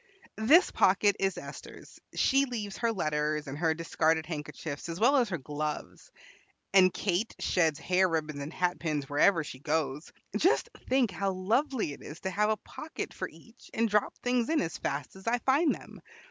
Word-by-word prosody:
"This 295 +12 +6
pocket 200 +1 +4
is 195 -1 0
Esther's. - - -10 0.2
She 275 0 +3
leaves 215 -6 -5
her 230 -1 +1
letters 150 -5 -1
and 135 -1 -6
her 160 -1 +2
discarded 160 -1 +1
handkerchiefs, 150 -1 -6
as 165 +1 -5
well 265 +6 +5
as 240 -5 +2
her 180 - -2
gloves. 150 +1 -5 0.6
And 185 -1 +7
Kate 195 +4 -1
sheds 160 -5 +1
hair 185 +1 +2
ribbons 155 -3 -2
and 140 +2 -5
hatpins 175 -5 -1
wherever 165 +4 +3
she 130 -3 -9
goes. 150 0 -2 0.2
Just 335 - +2 0.2
think 255 -5 +3
how 195 0 -1
lovely 220 - 0
it - - -12
is 150 - -9
to 190 - -2
have 210 +3 +1
a 215 - +1
pocket 310 +8 -7
for - - -4
each, 230 +1 -18
and 230 +1 +2
drop 210 -1 +1
things 245 0 0
in 320 -1 +2
as 165 - -2
fast 140 +3 -3
as 190 +3 -13
I 240 +1 +3
find 280 +6 +2
them. - - -13
185 Hz, 180 wpm, -30 LUFS, 155-230 Hz, 0.6 s, And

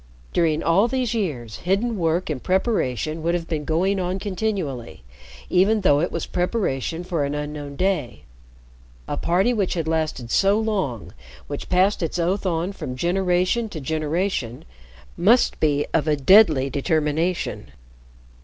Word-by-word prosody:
During 160 -2 +1
all 190 +7 +4
these 250 -2 -1
years, 140 - -3
hidden 200 +6 0
work 170 -1 0
and 135 -4 -4
preparation 165 - 0
would 170 +2 0
have 170 -1 -3
been 155 -3 -3
going 185 +6 +1
on 180 +1 -1
continually, 185 - -3 0.4
even 200 +4 +3
though 145 -7 +4
it 170 - -1
was - - -3
preparation 175 - -2
for 175 -4 -1
an 140 +1 -2
unknown 150 -1 -5
day. 180 -8 -1 0.8
A - - -2
party 190 +8 +1
which 200 -6 0
had 165 -2 -2
lasted 155 -7 -2
so 200 +2 +3
long 190 - -2 0.3
which 145 - -6
passed 190 +3 +2
its 165 +1 -2
oath 185 +3 0
on 170 +2 -1
from 130 -10 -6
generation 180 - +1
to 170 - -6
generation 155 - -2 0.5
must 235 +7 +3
be 145 -2 +2
of 160 -1 +1
a 150 - +3
deadly 155 -2 +5
determination. 155 +5 -1
170 Hz, 145 wpm, -23 LUFS, 150-195 Hz, 0.8 s, deadly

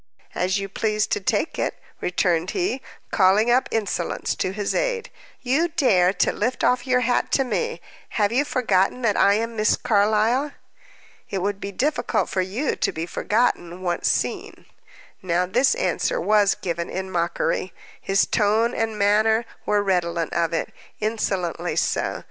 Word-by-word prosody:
"As 185 +2 0
you 195 0 -3
please 215 +2 0
to 420 - -1
take - - -1
it," - - -1 0.2
returned 175 -1 0
he, 355 -8 -1 0.3
calling 205 +4 +4
up 255 +2 +2
insolence 200 -6 -2
to 185 - -1
his 205 +1 -2
aid. - - -1 0.3
"You 275 +7 +2
dare 225 - +3
to - - +1
lift 245 +5 -2
off 250 +1 +2
your 250 -1 +3
hat 245 0 +1
to 270 - +4
me! 470 - -2 0.4
Have 205 -1 +2
you 260 +5 +2
forgotten 245 -4 +1
that 210 -3 +2
I 200 - +4
am 230 +1 -2
Miss 215 0 +2
Carlyle?" 220 +6 +2 0.8
"It 195 - -2
would 200 0 -1
be 200 - -5
difficult 280 +10 0
for 190 - 0
you 210 +10 -2
to - - 0
be 160 +1 -4
forgotten, 185 -3 -1
once 175 -1 -1
seen." - - -3 0.6
Now 180 0 +1
this 250 - +2
answer - - 0
was 210 - +3
given 170 -1 -4
in 190 0 -4
mockery; 170 +1 -1 0.3
his 195 0 +2
tone 220 +3 +2
and 225 -1 -2
manner 215 +3 +3 0.2
were 205 -1 +2
redolent 170 -3 0
of 170 -1 +1
it, 165 - -2 0.3
insolently 200 -6 -2
so. - - 0
210 Hz, 160 wpm, -23 LUFS, 185-245 Hz, 0.8 s, calling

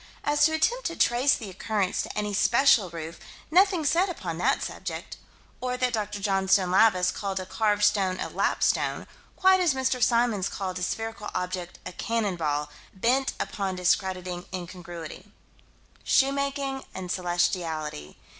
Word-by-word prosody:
As 295 0 +2
to 315 - +2
attempt 485 +10 +1
to 335 - -5
trace 250 +3 +3
the 210 -4 -7
occurrence 200 0 -1
to - - -7
any 210 -1 -1
special 235 -1 +4
roof 165 0 -7 0.3
nothing 365 -2 +4
said 345 +6 +3
upon 175 - -5
that 265 +8 +1
subject. - - -6 0.5
Or 250 0 -2
that 250 -1 0
Dr. 210 -2 -2
Johnstone 195 -2 +2
Lavis 185 -2 +4
called 195 -2 -3
a 185 - -5
carved 210 +1 0
stone 195 -3 +2
a - - -2
"lapstone," - - 0 0.3
quite 375 0 +5
as 345 -7 +2
Mr. 260 -1 0
Symons 235 -4 +2
called 185 -2 -4
a - - -8
spherical 225 +3 -3
object 180 -1 -4
a 185 - -5
"cannon 215 0 -1
ball": 150 -3 -2 0.2
bent 250 +7 +1
upon 195 -2 -2
a - - -9
discrediting 180 0 0
incongruity: 175 0 -8 0.7
Shoemaking 275 0 +1
and 185 -1 -5
celestiality. 175 - -2
205 Hz, 150 wpm, -26 LUFS, 180-255 Hz, 0.7 s, quite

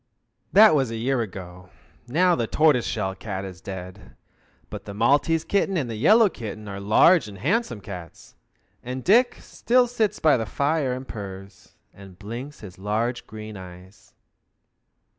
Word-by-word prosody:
That 215 -1 +7
was 135 -5 +2
a 115 - -5
year 125 +2 0
ago. 90 -3 -8 0.4
Now 175 +8 +3
the 120 -7 -1
tortoise 150 -4 +3
shell 95 -4 -2
cat 95 0 -6
is 90 -2 -10
dead, 95 0 -9 0.6
but 105 -2 -7
the 100 - -8
Maltese 145 +8 +2
kitten 195 -1 0
and 140 -6 -1
the - - -4
yellow 210 - +5
kitten 110 - -7
are 100 -1 -6
large 110 - +4
and 100 -2 -10
handsome 125 - -1
cats, 90 -4 -10 0.5
and 125 +1 -6
Dick 240 +6 +4
still 250 +1 +2
sits 220 -4 -1
by 155 -4 +4
the 115 -2 -3
fire 140 - 0
and 130 +1 -7
purrs, 95 -2 -10 0.2
and 95 -2 -14
blinks 120 +9 -8
his 95 -4 -11
large 110 +5 -2
green 110 0 -9
eyes. 90 0 -13
115 Hz, 160 wpm, -24 LUFS, 100-150 Hz, 0.6 s, That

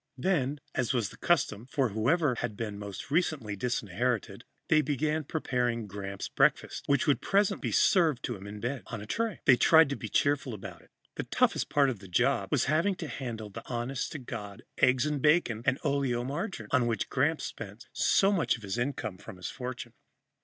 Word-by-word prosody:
Then, 145 -2 0
as 125 0 0
was 115 -5 0
the - - -13
custom 125 -9 +1
for 135 -2 +1
whoever 130 - +2
had 115 -3 -4
been 105 -3 -4
most 100 +5 -7
recently 145 - 0
disinherited, 120 +1 -2 0.2
they 155 -1 +5
began 150 +2 0
preparing 125 -6 -1
Gramps' 100 -1 -5
breakfast, - - +1
which 140 -1 +3
would 145 - +2
presently 200 0 +1
be - - -2
served 160 - +3
to 120 - -2
him 100 0 -10
in 105 +1 -7
bed, 120 +3 -3
on 115 - -5
a 105 - -8
tray. 225 - -2
They 125 - +7
tried 160 +1 +6
to 140 - -1
be - - -6
cheerful 140 -4 +1
about 95 - -9
it. - - -23 0.3
The - - -1
toughest - - +1
part 140 -2 +3
of 115 - -7
the 100 - -12
job 90 - +1
was - - +2
having 165 +8 +2
to 165 - -6
handle 115 -7 -5
the 115 - -7
honest 125 +2 -2
to - - -4
God 105 -6 -7 0.2
eggs 130 0 +4
and 150 -2 -1
bacon 150 -7 +3
and 130 0 +2
oleomargarine, 135 - -2
on 130 -3 +3
which 115 -2 -2
Gramps 150 +4 +1
spent 105 +1 -7
so 195 +1 +3
much 180 -6 +2
of 115 - -15
the 105 +4 -2
income 120 -8 -3
from - - -10
his 90 - -5
fortune. 125 -2 -6
125 Hz, 195 wpm, -29 LUFS, 110-150 Hz, 0.3 s, They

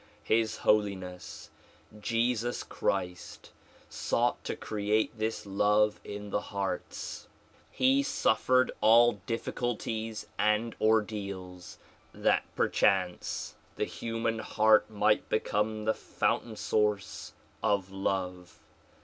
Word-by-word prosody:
His 110 0 +1
Holiness 95 -4 -1 0.5
Jesus 115 +2 0
Christ 90 0 -3 0.4
sought 120 +1 0
to - - -2
create 105 +1 -1
this 110 0 -3
love 105 +2 +2
in 105 0 -7
the 105 - 0
hearts. 100 -2 -4 0.4
He 265 +2 +3
suffered 130 - +2
all 115 -1 +5
difficulties 115 -2 -3
and 105 +2 +2
ordeals 100 -5 -1 0.4
that - - +2
perchance 90 -2 +1 0.2
the - - -1
liuman 115 0 -3
heart 110 0 +4
might 105 0 +1
become 110 0 0
the 110 - +3
fountain 110 0 -1
source 105 -2 -1 0.3
of 95 -2 +1
love. 90 -2 -3
105 Hz, 95 wpm, -30 LUFS, 100-115 Hz, 0.5 s, all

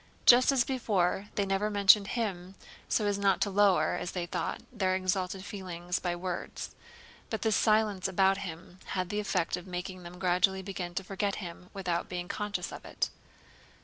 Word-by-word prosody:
Just 255 +2 +8
as 265 -3 +3
before, 205 -7 0
they 200 - +1
never 195 +2 0
mentioned 200 0 +6
him 190 -4 -3 0.3
so 215 - +2
as 205 -1 0
not 195 -1 +3
to 200 - +1
lower 195 -6 +4
(as - - -3
they 180 -2 -2
thought) - - -3
their 190 -5 +1
exalted 185 0 -1
feelings 180 -3 -4
by 175 -1 -1
words; 180 0 -5 0.6
but 220 - -3
this 220 -2 +3
silence 215 -4 +2
about 195 +1 +3
him 175 0 -8 0.2
had 185 -1 -1
the 210 - -1
effect 185 -5 0
of 180 +1 -10
making 180 +1 -5
them 175 0 -10
gradually 190 +1 +2
begin 180 -2 -5
to 195 - -1
forget 195 +1 -2
him 180 -1 -8
without 180 -4 -2
being 180 -1 -4
conscious 200 -3 -3
of - - -8
it. - - -2
190 Hz, 180 wpm, -30 LUFS, 180-205 Hz, 0.6 s, Just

